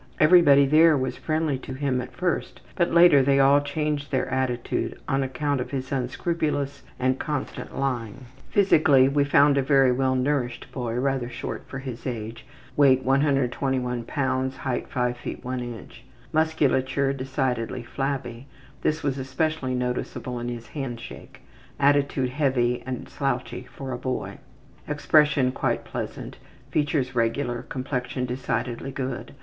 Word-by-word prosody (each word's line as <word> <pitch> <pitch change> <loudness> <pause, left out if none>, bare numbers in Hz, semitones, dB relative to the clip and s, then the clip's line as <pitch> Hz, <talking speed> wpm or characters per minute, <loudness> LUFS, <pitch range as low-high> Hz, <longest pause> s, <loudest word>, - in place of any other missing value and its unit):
Everybody 155 -4 +7
there 155 +2 +5
was 130 0 -2
friendly 155 -4 -1
to 130 - -7
him 130 -2 0
at 125 - -8
first, 180 -1 -2 0.2
but 175 -1 +2
later 170 -5 +7
they 140 +1 +3
all 140 +1 +6
changed 145 0 -2
their - - 0
attitude 130 -2 -1
on 135 0 +1
account 135 +1 -1
of - - -5
his 130 -2 -4
unscrupulous 140 +1 -2 0.2
and 130 +1 0
constant 150 -4 -4
lying. 130 -2 -3 0.2
Physically 155 -9 +5
we 140 +1 +2
found 140 0 +4
a - - +3
very 135 -1 +4
well 130 +1 +1
nourished 125 -2 -1
boy, 120 -3 -3
rather 130 -1 0
short 120 - -6
for 135 - -6
his 130 -2 -6
age. 115 +1 -6 0.3
Weight 130 -2 +5
121 130 -2 +1
lbs.; 130 -1 -1
height 130 -3 -3
5 125 -2 -1
ft. - - -6
1 125 0 -3
in. 120 -2 -6 0.5
Musculature 140 -4 +1
decidedly 130 -3 -2
flabby; 130 -1 -4 0.3
this 155 +1 0
was 140 -1 -1
especially 130 0 -1
noticeable 125 0 -3
in 120 0 -4
his 115 -2 -7
handshake. 125 -5 -7 0.4
Attitude 140 -2 +2
heavy 125 -4 +1
and 130 -1 -4
slouchy 135 -3 -3
for 135 -1 -5
a 125 - -4
boy. 130 - -4 0.5
Expression 150 -3 +3
quite - - -1
pleasant; - - -6 0.3
features 145 -4 0
regular; 120 +1 0
complexion 125 -1 -3
decidedly 125 0 -3
good. 130 0 -5
135 Hz, 140 wpm, -25 LUFS, 125-145 Hz, 0.5 s, Everybody